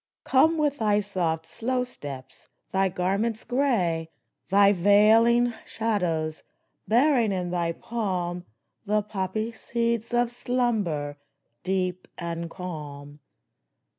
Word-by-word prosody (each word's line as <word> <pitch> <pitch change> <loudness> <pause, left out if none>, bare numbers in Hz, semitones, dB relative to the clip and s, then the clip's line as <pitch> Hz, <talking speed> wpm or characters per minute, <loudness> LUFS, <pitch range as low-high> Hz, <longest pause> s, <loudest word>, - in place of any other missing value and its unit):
Come 320 +5 +4
with 295 -2 0
thy 210 -2 +3
soft, 175 -6 -2
slow 250 +8 -2
steps, 140 - -10 0.2
thy 190 0 +2
garments 195 +5 -1
gray, 205 - 0 0.4
Thy 200 +1 +6
veiling 220 +5 +5
shadows, 170 -8 -1 0.5
bearing 240 -1 +4
in 180 -2 -2
thy 170 -1 0
palm 180 -6 -3 0.4
The 210 0 +2
poppy 210 +2 -3
seeds 235 0 -2
of 240 0 +2
slumber, 215 - -1 0.4
deep 185 -1 -2
and 170 -1 -4
calm 150 -5 -8
200 Hz, 105 wpm, -26 LUFS, 170-235 Hz, 0.5 s, Thy